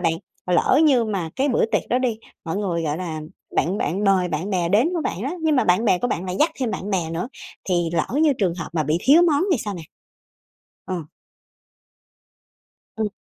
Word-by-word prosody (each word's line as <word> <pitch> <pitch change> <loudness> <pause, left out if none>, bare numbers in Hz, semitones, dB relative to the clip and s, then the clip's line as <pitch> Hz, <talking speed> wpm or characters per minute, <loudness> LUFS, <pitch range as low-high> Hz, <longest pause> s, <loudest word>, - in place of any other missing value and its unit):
bạn, 165 -2 +2 0.3
lỡ 180 - +3
như 255 -6 +4
mà 190 -7 -3
cái 275 +2 +1
bữa 235 - +2
tiệc - - 0
đó 250 - +2
đi, 240 -4 -1 0.3
mọi 165 +3 -3
người, 175 -5 -1
gọi 150 -1 -1
là, 165 -4 -4 0.4
bạn 190 +5 +1
bạn 195 +7 -1
mời 190 -2 +3
bạn 165 +6 -3
bè 175 -3 0
đến 220 - +3
của 335 - 0
bạn 190 - -3
đó, 275 - -2
nhưng 310 -3 +2
mà - - +3
bạn 180 +6 +3
bè 185 -4 +3
của 245 - -1
bạn 175 - -2
lại 185 0 -3
dắt 320 - +4
thêm 240 -4 0
bạn 205 - -4
bè 170 -4 -1
nữa, 175 +8 -3 0.4
thì 175 -2 +1
lỡ 165 - +1 0.2
như 300 -3 +5
trường 180 -5 +1
hợp 165 -3 -6
mà 160 -2 +1
bị 155 +3 0
thiếu 295 - +6
món 320 0 +3
thì 265 - +2
sao 205 -2 -3
nè? 170 - -7 1.0
Ờ. 185 - -3 2.0
Ừ. 220 -1 0
190 Hz, 220 wpm, -22 LUFS, 170-245 Hz, 2.0 s, thiếu